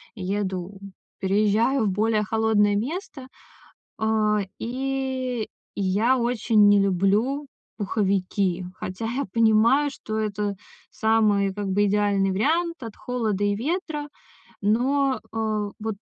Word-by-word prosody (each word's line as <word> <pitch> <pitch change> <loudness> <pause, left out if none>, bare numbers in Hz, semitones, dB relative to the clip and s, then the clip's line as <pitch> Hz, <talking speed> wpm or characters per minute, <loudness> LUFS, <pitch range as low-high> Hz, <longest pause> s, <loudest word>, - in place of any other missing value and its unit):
еду 190 -1 -3 0.4
переезжаю 215 +6 +2
в 200 - +2
более 215 +2 +1
холодное 215 -1 +2
место. 270 - -4 0.7
Э, 215 -1 +2 0.2
и 260 -1 -2 0.3
я 205 +6 +2
очень 230 -3 +3
не 205 0 +6
люблю 200 +9 +1 0.3
пуховики, 195 -3 0
хотя 185 +4 -6
я 245 +5 -2
понимаю, 230 +6 +4
что 220 -5 -6
это 210 -1 -2 0.3
самый 215 -3 +2
как 205 0 -4
бы 200 +2 +2
идеальный 200 -1 +2
вариант 325 - 0
от 225 -3 -7
холода 220 -5 -2
и 205 0 +2
ветра. 300 - -3 0.5
Но, 260 +6 +2
э, 215 -2 -1
вот 220 -1 -4
215 Hz, 110 wpm, -24 LUFS, 200-250 Hz, 0.7 s, не